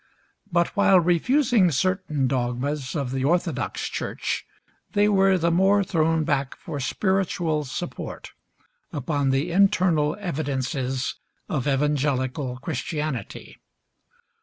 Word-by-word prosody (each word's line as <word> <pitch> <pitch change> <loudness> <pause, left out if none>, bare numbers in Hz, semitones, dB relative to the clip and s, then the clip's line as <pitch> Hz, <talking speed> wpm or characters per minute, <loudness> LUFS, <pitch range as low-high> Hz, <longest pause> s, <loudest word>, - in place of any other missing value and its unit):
But 170 0 +2
while 195 -2 +5
refusing 200 - +3
certain 165 -3 0
dogmas 130 +3 -2
of 140 -5 -2
the 135 0 -2
orthodox 170 +5 0
church, - - -3 0.5
they 205 0 +4
were 195 -2 +4
the 170 -1 +1
more 195 +4 +4
thrown 165 -3 +1
back 140 -2 -1
for 150 -3 -6
spiritual 170 -1 0
support 175 +7 -6 0.6
upon 145 -2 -1
the 135 +6 0
internal 180 -5 +3
evidences 135 -6 -2 0.3
of 135 -2 -2
evangelical 135 -2 0
Christianity. 150 - -4
155 Hz, 105 wpm, -24 LUFS, 135-185 Hz, 0.6 s, while